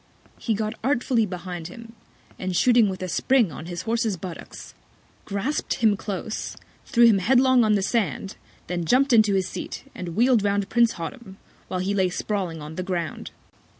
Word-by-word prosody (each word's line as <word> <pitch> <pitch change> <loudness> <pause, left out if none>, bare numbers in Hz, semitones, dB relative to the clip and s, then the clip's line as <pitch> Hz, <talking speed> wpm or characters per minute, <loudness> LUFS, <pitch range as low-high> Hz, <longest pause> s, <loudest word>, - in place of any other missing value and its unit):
He 225 - 0
got 215 +1 -2
artfully 245 -3 +1
behind 180 -2 -6
him, 230 +5 -11 0.5
and 185 -1 -3
shooting 235 0 +5
with 185 0 -5
a - - -2
Spring 235 +2 +2
on 160 - -8
his 175 0 -5
Horses 225 -2 0
Buttocks, 175 0 -9 0.5
grasp'd 205 +9 -2
him 220 -3 +3
close, 205 +1 -5 0.3
threw 240 -4 +5
him 220 -4 +5
headlong 255 +4 +4
on 215 -1 +3
the 200 - +1
Sand, 195 -3 -1 0.3
then 175 -1 -3
jump'd 255 - +3
into 215 -3 +5
his 190 -1 +1
Seat, - - -6
and 170 -2 -6
wheel'd 240 -1 +4
round 200 -1 +1
Prince 235 0 +3
Hottam, 190 +3 -8 0.3
while 185 - -2
he 195 +2 -1
lay 190 -2 +2
sprawling 180 -4 -3
on 155 +1 -9
the - - -1
Ground. 170 -3 -3
205 Hz, 175 wpm, -24 LUFS, 185-235 Hz, 0.5 s, shooting